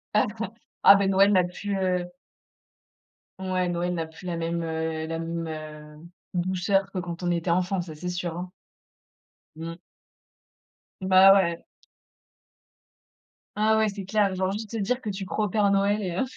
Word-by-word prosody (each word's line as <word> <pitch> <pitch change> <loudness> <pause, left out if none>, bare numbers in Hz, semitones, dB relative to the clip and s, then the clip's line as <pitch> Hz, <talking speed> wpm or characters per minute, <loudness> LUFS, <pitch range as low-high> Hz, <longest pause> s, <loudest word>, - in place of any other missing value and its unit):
Ah, - - +4
ben, - - -7 0.5
ah - - +10
bah, 200 0 +2
Noël 195 +1 +5
n'a 185 -3 +5
plus, 200 +3 -5
heu 180 -1 0 1.3
Ouais, 185 -1 -1
Noël 175 0 -1
n'a 165 -2 -2
plus 160 +3 -14
la 170 -1 -2
même, 170 0 -2
heu, 160 -1 -3
la 165 0 -3
même, 165 0 -4 0.5
heu, 170 - -13 0.3
douceur 185 +2 0
que 190 - -3
quand 175 0 -6
on 175 - +1
était 170 0 -1
enfants. 180 +2 +1
Ça, 170 -2 -8
c'est 155 +4 -7
sûr, 175 -2 -3
hein. 180 +1 -5 1.1
Mmh. 165 +1 -6 1.3
Bah, 190 +1 +7
ouais. 170 -4 +1 1.9
Ah, 220 +1 +3
ouais, 220 0 +3
c'est 200 -1 -6
clair, 200 0 +1
genre, 185 0 0
juste 210 +2 -5
te 230 - -3
dire 225 +5 0
que 215 - -4
tu 195 -1 -4
crois 210 +3 -1
au - - -3
Père 205 +1 +2
Noël, 200 +2 +2
et 180 -2 -3
heu - - +2
185 Hz, 170 wpm, -26 LUFS, 170-195 Hz, 1.9 s, ah